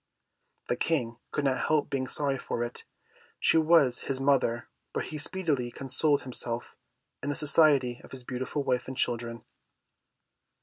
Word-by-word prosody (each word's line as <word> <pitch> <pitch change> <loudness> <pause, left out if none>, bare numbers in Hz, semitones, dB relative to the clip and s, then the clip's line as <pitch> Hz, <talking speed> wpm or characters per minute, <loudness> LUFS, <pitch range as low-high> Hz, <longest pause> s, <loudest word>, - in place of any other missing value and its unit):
The - - +1
King 120 -8 -1
could 145 - -2
not 130 -1 +1
help 155 -2 +2
being 130 -2 -1
sorry 140 -2 0
for 120 - -2
it; 120 0 -6 0.5
she 165 - +4
was 155 -6 +5
his 135 -1 -1
mother, 135 -4 +2 0.3
but - - -1
he 155 - -6
speedily 145 -7 -1
consoled 135 +3 +1
himself 120 -2 -3 0.5
in 145 - -3
the 145 - -1
society 140 -5 +4
of - - -13
his 130 -2 -9
beautiful 130 +3 -3
wife 125 -2 0
and 130 0 -6
children. 115 -1 -1
135 Hz, 150 wpm, -29 LUFS, 125-145 Hz, 0.5 s, was